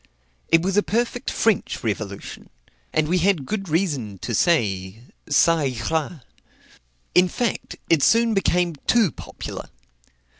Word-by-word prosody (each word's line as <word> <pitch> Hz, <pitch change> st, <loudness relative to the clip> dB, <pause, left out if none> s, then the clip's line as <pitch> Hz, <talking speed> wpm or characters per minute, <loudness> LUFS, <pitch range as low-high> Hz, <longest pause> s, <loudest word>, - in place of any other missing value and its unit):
It 165 Hz, 0 st, +4 dB
was 195 Hz, +2 st, 0 dB
a -, -, +6 dB
perfect 240 Hz, +3 st, -1 dB
French 225 Hz, -4 st, 0 dB
revolution; 100 Hz, -3 st, -5 dB, 0.4 s
and 155 Hz, -1 st, +1 dB
we 180 Hz, +3 st, +2 dB
had 175 Hz, -5 st, +2 dB
good 195 Hz, +2 st, -4 dB
reason 145 Hz, -, -1 dB
to 120 Hz, -, -3 dB
say, 105 Hz, -, +1 dB, 0.3 s
Ca 165 Hz, 0 st, +5 dB, 0.3 s
ira. 160 Hz, -2 st, -2 dB, 0.9 s
In 180 Hz, +1 st, +5 dB
fact, 235 Hz, +5 st, -3 dB
it 165 Hz, -3 st, +3 dB
soon 230 Hz, +7 st, +4 dB
became 180 Hz, -3 st, +1 dB
too 225 Hz, -, +4 dB
popular. -, -, -8 dB
170 Hz, 125 wpm, -23 LUFS, 130-195 Hz, 0.9 s, a